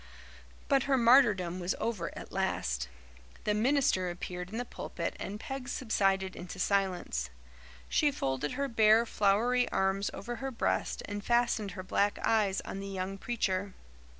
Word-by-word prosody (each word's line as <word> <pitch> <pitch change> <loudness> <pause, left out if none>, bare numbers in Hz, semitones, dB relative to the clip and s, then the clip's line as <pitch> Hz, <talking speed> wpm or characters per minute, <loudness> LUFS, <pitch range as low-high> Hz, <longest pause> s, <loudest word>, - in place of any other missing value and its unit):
But 275 -2 +3
her 270 - +4
martyrdom 230 -8 +5
was 180 +1 -1
over 215 -7 -2
at - - -9
last. 65 0 -1 0.5
The 210 - +1
minister 220 -5 +2
appeared 180 +1 -5
in 220 - -5
the 245 - -2
pulpit - - -5
and 205 +2 -5
Peg 270 +1 -6
subsided 195 -6 0
into 180 +2 -8
silence. 180 - 0 0.6
She 300 - +3
folded 135 - -2
her 280 +2 -1
bare, 225 -1 +5
floury 235 +4 +2
arms 195 +1 +1
over 240 +4 -6
her 270 +4 -3
breast 235 - -1
and 205 0 -5
fastened 235 -4 +1
her 185 - -5
black 200 +2 +1
eyes 210 -4 +2
on 195 - -6
the 195 - -5
young 195 0 -4
preacher. 200 -5 -1
205 Hz, 150 wpm, -31 LUFS, 185-235 Hz, 0.6 s, martyrdom